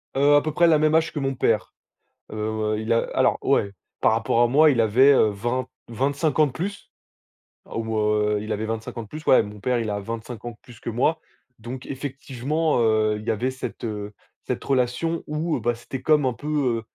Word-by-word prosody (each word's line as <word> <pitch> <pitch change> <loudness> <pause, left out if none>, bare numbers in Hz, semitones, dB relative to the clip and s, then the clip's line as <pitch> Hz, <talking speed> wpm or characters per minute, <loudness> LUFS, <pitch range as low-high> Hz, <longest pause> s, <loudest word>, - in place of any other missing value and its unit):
Heu 145 +2 +5
à 145 - +5
peu 155 - -2
près 170 +1 +4
la 160 -2 +5
même 155 +1 +2
âge 160 0 +2
que 150 - -3
mon 135 -1 -1
père, 110 -3 0 0.6
heu - - -7 0.4
heu, 105 - -3
il 110 +1 0
a 115 - +4 0.2
alors - - +2
ouais, 100 - +1 0.3
par - - +3
rapport 110 +1 +1
à 120 - +5
moi, 150 +5 +5
il 125 -5 +1
avait, 125 +6 +5
heu, 110 -6 +4
vingt 120 +5 -2 0.2
vingt-cinq 140 +6 -1
ans 155 - +6
de 135 - -7
plus. 200 +8 -6 0.7
Ou, 110 -1 -3
heu, 105 0 +1
il 110 +1 -6
avait 105 +1 -2
25 115 +1 -5
ans 115 - -3
de - - -13
plus, 155 +4 -8
ouais - - +7
mon 105 0 -9
père 125 +2 0
il 110 - -2
a 105 0 -2
25 115 +2 -7
ans 120 - -4
de 110 - -17
plus 120 -4 -15
que - - -5
moi. 130 +8 +1 0.4
Donc 125 +4 -7
effectivement, 140 +2 -2
heu, 110 -1 +2
il 110 - -10
y - - +3
avait 120 +5 -1
cette, 130 - -7
heu, 105 -2 -5 0.3
cette - - -3
relation 135 +6 0
où 155 +2 -1
bah 120 0 0
c'était 125 +2 -7
comme 150 -3 +3
un 125 - +1
peu, 135 -3 -1
120 Hz, 225 wpm, -24 LUFS, 110-145 Hz, 0.7 s, ouais